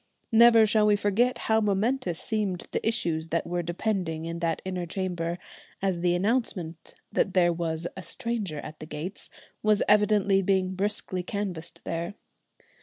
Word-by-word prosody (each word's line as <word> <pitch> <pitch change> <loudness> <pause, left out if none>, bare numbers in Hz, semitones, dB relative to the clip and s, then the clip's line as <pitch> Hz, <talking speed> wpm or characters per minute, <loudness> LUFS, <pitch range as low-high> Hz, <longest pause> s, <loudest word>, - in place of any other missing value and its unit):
Never 230 0 +7
shall 215 0 +3
we 210 - +5
forget 205 +5 +2
how 220 0 +3
momentous 205 -2 0
seemed 205 -5 -2
the - - -2
issues 165 -8 0
that 165 +1 -1
were 175 +1 -1
depending 175 -2 -2
in 170 0 -4
that 165 -1 0
inner 180 -2 -3
chamber, 175 -2 -2 0.4
as 190 -3 0
the 175 0 +2
announcement 185 -5 -1 0.2
that 190 - 0
there 175 -2 +4
was 165 -1 -2
a 190 - -6
"stranger 210 - -3
at 155 - -9
the 155 - -8
gates" 170 +7 -6 0.3
was 215 -1 +3
evidently 205 -2 +4
being 190 -1 +1
briskly 190 -1 -2
canvassed 180 -4 -5
there. 170 +4 -3
185 Hz, 155 wpm, -27 LUFS, 170-210 Hz, 0.4 s, Never